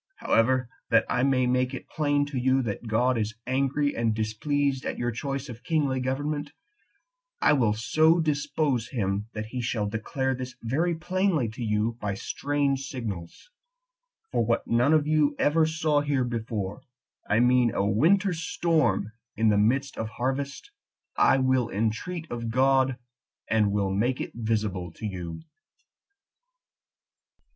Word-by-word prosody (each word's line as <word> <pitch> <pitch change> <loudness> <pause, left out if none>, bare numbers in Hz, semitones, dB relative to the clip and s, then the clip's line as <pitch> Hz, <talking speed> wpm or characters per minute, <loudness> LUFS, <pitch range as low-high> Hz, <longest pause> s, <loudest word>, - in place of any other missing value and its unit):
However, 125 +2 +2 0.2
that - - +4
I - - 0
may 130 -1 +3
make 125 +1 +1
it - - -9
plain 145 -2 +1
to 145 -2 -5
you 130 +1 +2
that 115 +1 -4
God 120 +2 +2
is 110 +1 -2
angry 140 +3 0
and 115 -2 0
displeased 135 +5 -1
at - - -3
your 120 0 -1
choice 135 +3 -4
of 120 -1 -9
kingly 140 -2 0
government, 145 +3 -2 0.9
I - - +4
will 120 -7 +3
so 155 +10 +3
dispose 145 -5 0
him 100 -4 -2
that 105 0 -4
he 125 +3 -5
shall 115 -2 -1
declare 120 +5 -2
this 130 0 -6
very 160 +9 0
plainly 175 - 0
to 115 +3 -9
you 110 +2 0
by 100 -2 -2
strange 140 +4 -1
signals; 110 - -7 0.8
for - - +1
what 115 +1 0
none 120 +5 +2
of 155 -2 +3
you 150 -1 +2
ever 155 +2 +3
saw 155 -2 +1
here 145 -3 0
before, 110 -4 -4 0.5
I 105 - +3
mean 125 -1 +4
a 100 - 0
winter 180 - +3
storm 160 - 0 0.2
in 110 +1 +3
the 105 - +3
midst 130 +6 +1
of 110 - -2
harvest, 140 - -3 0.5
10 - - +5
I - - +5
will 130 -2 +2
entreat 115 - -2
of 115 -1 -3
God, 130 +1 +3 0.5
and 105 -2 +2
will 100 -1 0
make 120 +7 0
it - - -4
visible 105 -6 -2
to - - -8
you." 90 - -5
125 Hz, 150 wpm, -27 LUFS, 110-145 Hz, 0.9 s, 10